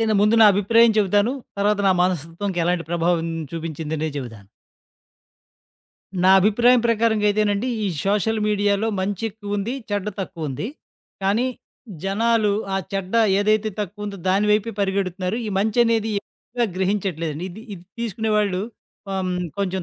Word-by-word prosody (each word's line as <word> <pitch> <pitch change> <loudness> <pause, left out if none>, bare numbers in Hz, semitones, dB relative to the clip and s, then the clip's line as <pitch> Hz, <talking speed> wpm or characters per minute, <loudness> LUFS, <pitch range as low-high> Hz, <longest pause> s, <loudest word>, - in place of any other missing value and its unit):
నేను 220 -1 +2
ముందు 210 +2 +4
నా - - +9
అభిప్రాయం 225 +3 +4
చెబుతాను. 205 +4 +2 0.3
తర్వాత 205 +1 +2
నా - - +5
మనస్తత్వంకి 175 +2 -2
ఎలాంటి 175 -2 0
ప్రభావం 170 -1 +1 0.3
చూపించిందని 160 -1 -3
చెబుతాను. 115 -7 -9 1.8
నా - - +6
అభిప్రాయం 240 +5 +4
ప్రకారంగా 220 -2 +2
అయితే 215 +1 +1
నండి. 205 +5 -1 0.2
ఈ - - +1 0.2
సోషల్ 210 +2 +1
మీడియా‌లో 205 +1 +1
మంచి 195 +1 -2
ఎక్కువ 205 0 -5
ఉంది. 205 +4 -2 0.2
చెడ్డ 205 0 -1
తక్కువ 165 -5 -5
ఉంది. 135 - -4 0.5
కానీ 205 +6 +2 0.6
జనాలు 215 +1 +2 0.2
ఆ - - +1 0.2
చెడ్డ 195 -1 -3 0.3
ఏదైతే 215 +1 +2
తక్కువ 205 +1 -5
ఉందో 200 -1 -5
దాని 195 +3 +2
వైపే 215 +2 +1
పరిగెడుతున్నారు. 190 0 -1
ఈ - - -3
మంచి 215 +3 0
అనేది 225 -1 +1
ఎక్కువగా 240 0 -4
గ్రహించట్లేదండి. 180 -5 -1
ఇది 210 +5 -11
ఇది 175 -1 -13 0.2
తీసుకునే 220 -1 -2
వాళ్ళు 200 -3 +1 0.5
ఆహ్, 190 -1 -1 0.3
కొంచెం 190 -2 -1
200 Hz, 140 wpm, -22 LUFS, 185-215 Hz, 1.8 s, నా